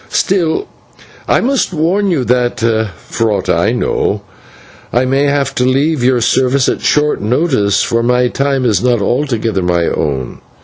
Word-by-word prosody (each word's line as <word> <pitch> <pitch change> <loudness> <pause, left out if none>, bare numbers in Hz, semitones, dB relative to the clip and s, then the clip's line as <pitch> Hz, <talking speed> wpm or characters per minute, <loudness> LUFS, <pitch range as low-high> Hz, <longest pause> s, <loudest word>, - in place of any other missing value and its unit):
Still, 185 - 0 0.6
I - - +2
must 265 -6 0
warn 185 +6 +1
you, 145 -8 0
for 115 -3 -1
aught 100 - -2
I - - +2
know, - - -1 0.7
I 125 +2 +1
may 135 +2 +1
have 140 -1 0
to 125 - 0
leave 135 +2 +1
your 125 -1 +2
service 130 +3 +2
at - - -1
short 150 0 +1
notice, 110 - +1
for 115 -1 0
my 125 +1 +2
time 135 0 -1
is 105 -6 +2
not 125 -2 +2
altogether 115 -3 -1
my 85 -1 0
own. 70 -6 -3
125 Hz, 150 wpm, -14 LUFS, 115-145 Hz, 0.7 s, I